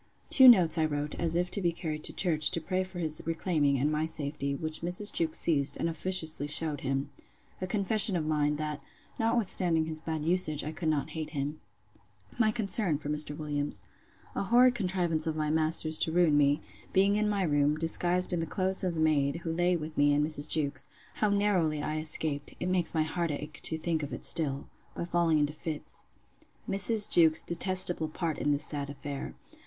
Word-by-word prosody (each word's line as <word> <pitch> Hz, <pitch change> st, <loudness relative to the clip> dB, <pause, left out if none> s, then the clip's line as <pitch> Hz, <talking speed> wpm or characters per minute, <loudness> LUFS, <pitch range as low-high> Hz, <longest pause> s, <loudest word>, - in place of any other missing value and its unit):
Two 260 Hz, -2 st, +7 dB
notes 180 Hz, -9 st, +6 dB
I 160 Hz, -, +2 dB
wrote, 145 Hz, -1 st, -4 dB
as 165 Hz, -1 st, -1 dB
if 180 Hz, +1 st, -1 dB
to 200 Hz, -, -3 dB
be 175 Hz, -2 st, +1 dB
carried 160 Hz, -3 st, -6 dB
to -, -, 0 dB
church, 155 Hz, -5 st, +1 dB
to -, -, -2 dB
pray 185 Hz, +3 st, -2 dB
for 185 Hz, -1 st, -9 dB
his 155 Hz, -3 st, +1 dB
reclaiming, 160 Hz, -4 st, -1 dB
and 145 Hz, +4 st, 0 dB
my 155 Hz, +1 st, -1 dB
safety; 145 Hz, -3 st, -3 dB
which 155 Hz, +2 st, -3 dB
Mrs. 180 Hz, +4 st, +4 dB
Jewkes 160 Hz, -2 st, 0 dB
seized, 145 Hz, -4 st, +1 dB
and -, -, -2 dB
officiously 160 Hz, -3 st, +1 dB
shewed 150 Hz, -1 st, 0 dB
him. 135 Hz, +1 st, -3 dB, 0.5 s
A 185 Hz, -, -3 dB
confession 200 Hz, +1 st, +4 dB
of 160 Hz, -3 st, -2 dB
mine, 150 Hz, -1 st, 0 dB
that, 150 Hz, 0 st, -5 dB, 0.4 s
notwithstanding 190 Hz, -8 st, +1 dB
his 155 Hz, -1 st, -3 dB
bad 160 Hz, -1 st, -5 dB
usage, 165 Hz, -4 st, +2 dB
I 155 Hz, -, -5 dB
could 160 Hz, 0 st, -4 dB
not 155 Hz, 0 st, -2 dB
hate 155 Hz, -1 st, -6 dB
him. 145 Hz, +3 st, -4 dB, 0.8 s
My 220 Hz, -2 st, +3 dB
concern 205 Hz, -6 st, 0 dB
for 145 Hz, 0 st, -8 dB
Mr. 150 Hz, 0 st, +1 dB
Williams. 145 Hz, -1 st, -3 dB, 0.4 s
A -, -, -3 dB
horrid 245 Hz, +4 st, +4 dB
contrivance 180 Hz, -7 st, -1 dB
of 160 Hz, -, -2 dB
my 155 Hz, -1 st, -2 dB
master's 155 Hz, 0 st, +1 dB
to 160 Hz, -, 0 dB
ruin 170 Hz, -3 st, +2 dB
me; 145 Hz, +1 st, +2 dB, 0.3 s
being 195 Hz, +1 st, +2 dB
in 210 Hz, 0 st, 0 dB
my 200 Hz, -2 st, -1 dB
room, 145 Hz, -2 st, +1 dB
disguised 175 Hz, +3 st, +1 dB
in 165 Hz, -2 st, -1 dB
clothes 190 Hz, +2 st, 0 dB
of 180 Hz, -2 st, -2 dB
the 160 Hz, -, -2 dB
maid's, 155 Hz, 0 st, 0 dB
who 165 Hz, -, -3 dB
lay 175 Hz, +2 st, +1 dB
with 155 Hz, 0 st, -8 dB
me 145 Hz, 0 st, +2 dB
and 150 Hz, +1 st, +1 dB
Mrs. 150 Hz, -1 st, -1 dB
Jewkes. 140 Hz, -3 st, -1 dB, 0.3 s
How 210 Hz, -, +1 dB
narrowly 185 Hz, -7 st, 0 dB
I 155 Hz, 0 st, -3 dB
escaped, 155 Hz, -2 st, 0 dB
(it 180 Hz, -, -3 dB
makes 180 Hz, -2 st, +1 dB
my 160 Hz, -, +2 dB
heart 170 Hz, +2 st, -3 dB
ache 150 Hz, +1 st, -7 dB
to 160 Hz, -, -1 dB
think 160 Hz, 0 st, -2 dB
of 145 Hz, -, -6 dB
it -, -, -6 dB
still!) 140 Hz, -4 st, +2 dB, 0.3 s
by -, -, -4 dB
falling 170 Hz, -2 st, +1 dB
into 150 Hz, 0 st, 0 dB
fits. 155 Hz, 0 st, -7 dB, 0.6 s
Mrs. 205 Hz, +2 st, +3 dB
Jewkes's 160 Hz, -2 st, +5 dB
detestable 175 Hz, -2 st, +1 dB
part 160 Hz, 0 st, -4 dB
in 145 Hz, -, 0 dB
this 145 Hz, +1 st, +1 dB
sad 145 Hz, -2 st, -3 dB
affair. 140 Hz, 0 st, -7 dB
160 Hz, 200 wpm, -28 LUFS, 150-180 Hz, 0.8 s, Two